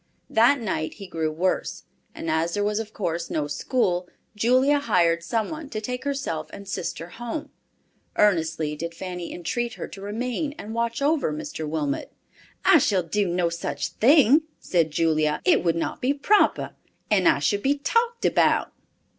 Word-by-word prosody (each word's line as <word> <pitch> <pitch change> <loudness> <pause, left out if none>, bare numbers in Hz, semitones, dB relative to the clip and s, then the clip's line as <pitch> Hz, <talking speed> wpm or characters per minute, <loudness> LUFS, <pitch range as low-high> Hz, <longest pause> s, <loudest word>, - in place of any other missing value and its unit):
That 240 +5 +5
night 190 -8 -3
he 200 - -9
grew 160 -4 -2
worse, 180 +4 -1 0.3
and - - -6
as 165 +2 0
there 205 - 0
was 210 +1 0
of 220 -1 -5
course 170 -5 -3
no 150 - -1
school, 180 - -1 0.3
Julia 255 +6 +3
hired 170 -9 +2
some 220 +5 -1
one 310 -2 -7
to 215 - -4
take 250 +4 -5
herself 275 - -3
and 200 0 -10
sister 170 -3 -4
home. 240 - -6 0.6
Earnestly 160 -6 +2
did 170 +2 -5
Fanny 180 -1 -6
entreat 235 +7 -3
her - - -6
to 195 - -10
remain 245 +8 -3
and 220 - -7
watch 235 +2 -1
over 300 0 +2
Mr. 295 - -5
Wilmot. 150 -3 -2 0.5
"I 380 -4 +7
shall 195 -8 +2
do 200 +4 0
no 175 0 +1
such 170 0 -3
thing," 280 +3 +5 0.2
said 170 -3 +1
Julia. 155 -1 +1
"It 355 -4 +4
would 170 -2 +2
not 165 - -3
be 270 +3 +1
proper, 405 +9 +2 0.4
and 195 -4 +4
I - - +5
should 175 +9 0
be 280 +4 +2
talked 465 +10 0
about." - - +2
205 Hz, 170 wpm, -25 LUFS, 170-255 Hz, 0.6 s, I